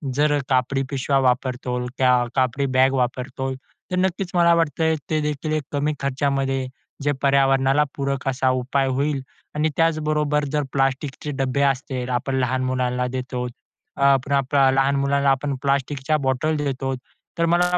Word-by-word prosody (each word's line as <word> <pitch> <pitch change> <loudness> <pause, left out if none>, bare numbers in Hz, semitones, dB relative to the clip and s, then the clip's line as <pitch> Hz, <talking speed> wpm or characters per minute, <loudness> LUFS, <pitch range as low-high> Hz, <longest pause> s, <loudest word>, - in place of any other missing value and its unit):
जर 145 0 +3
कापडी 130 +1 +1
पिशव्या 135 0 +1
वापरतो 125 -1 0
त्या 130 -1 +4 0.2
कापडी 130 +1 +1
बॅग 130 +1 +5
वापरतो. 130 +1 -2 0.4
तर - - 0
नक्कीच 185 0 0
मला 170 -1 +5
वाटतय, 160 0 +1
ते 155 -1 +1
देखील 150 +1 -2
एक 155 -2 0
कमी 145 +2 0
खर्चामध्ये 135 -1 0 0.4
जे 145 - +2
पर्यावरणाला 135 +1 +3
पूरक 140 -1 -2
असा 130 0 +1
उपाय 130 +2 0
होईल 140 +1 0 0.3
आणि 155 +1 +1
त्याचबरोबर 150 -2 +1
जर 150 -1 +1
प्लास्टिकचे 135 +2 -1
डब्बे 135 +1 0
असतील, 130 -2 -1
आपण 125 +2 -1
लहान 130 +1 0
मुलांना 125 -1 0
देतो. 125 -1 -4 0.5
अ, - - -5
आपण 140 0 +3
आपल्या 135 0 +3
लहान 135 +1 +2
मुलांना 140 0 +2
आपण 135 +1 -1
प्लास्टिकच्या 140 +2 0
बॉटल 155 +4 +1
देतो. 135 -2 -2 0.5
तर 170 - +3
मला 180 +1 +3
135 Hz, 150 wpm, -22 LUFS, 130-145 Hz, 0.5 s, बॅग